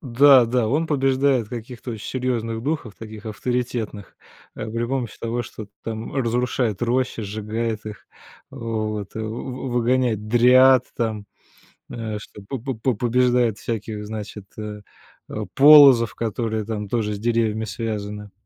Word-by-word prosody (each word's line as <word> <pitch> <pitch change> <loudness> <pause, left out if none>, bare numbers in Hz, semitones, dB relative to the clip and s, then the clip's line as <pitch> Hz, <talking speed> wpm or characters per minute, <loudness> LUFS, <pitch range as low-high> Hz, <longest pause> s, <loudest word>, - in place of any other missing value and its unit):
Да, 130 0 +6
да, 120 -1 +1
он 150 +7 +1
побеждает 135 -4 +2
каких-то 120 +1 -7
оч 110 -2 -8
серьёзных 115 -3 -2
духов, 140 -6 -3
таких 110 -1 -10
авторитетных, 110 -2 -3 0.4
э, 110 - -5
при 115 +1 -2
помощи 125 -3 -3
того, 115 +1 -2
что 110 -2 -9 0.2
там 110 +1 -5
разрушает 120 -4 0
рощи, 125 0 0
сжигает 110 +2 -3
их, 105 -1 -9 0.4
вот, 110 -5 -4
вы 110 - -3
вы 125 +4 -5
выгоняет 120 -3 +1
дриад 125 +2 +6
там, 110 -3 -2 0.6
э, 110 -2 -4
что 105 0 -12
по 135 - -4
по 130 +2 -4
по 125 +4 0
побеждает 120 0 +2
всяких, 110 -2 -4
значит, 105 -1 -7
э, 105 -1 -6 0.5
э, - - -4
полозов, 140 -5 +8
которые 110 -1 -2
там 105 -1 -4
тоже 105 -1 -1
с - - -7
деревьями 110 -1 0
связаны. 105 -2 -5
115 Hz, 140 wpm, -22 LUFS, 110-125 Hz, 0.6 s, полозов